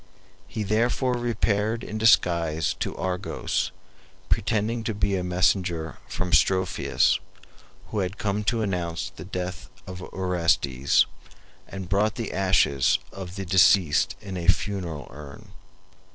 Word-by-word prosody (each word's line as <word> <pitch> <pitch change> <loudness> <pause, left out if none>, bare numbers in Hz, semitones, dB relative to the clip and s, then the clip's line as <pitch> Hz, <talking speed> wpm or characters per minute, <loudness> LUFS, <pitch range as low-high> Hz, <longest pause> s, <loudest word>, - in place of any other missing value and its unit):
He 110 - -4
therefore 120 +5 +1
repaired 115 -1 0
in 110 - -5
disguise 85 -7 +3
to - - -3
Argos, 90 -1 -2 0.6
pretending 110 +2 0
to 110 - -2
be 100 -1 0
a 90 - -1
messenger 90 -2 0
from 90 -2 -3
Strophius, 95 -1 +3 0.7
who 110 - -2
had 95 +1 -2
come 105 0 -1
to 115 0 +1
announce 85 -4 -2
the - - -10
death 90 -1 -5 0.2
of 95 0 -8
Orestes, 85 -8 +1 0.6
and 95 -2 -7
brought 100 +3 +1
the 115 -3 -4
ashes 95 -8 +3
of 95 -2 -8
the 100 -1 -4
deceased 90 -3 +4
in 95 -2 -6
a 85 -1 -4
funeral 95 -6 0
urn. 70 0 -11
95 Hz, 125 wpm, -25 LUFS, 90-105 Hz, 0.7 s, deceased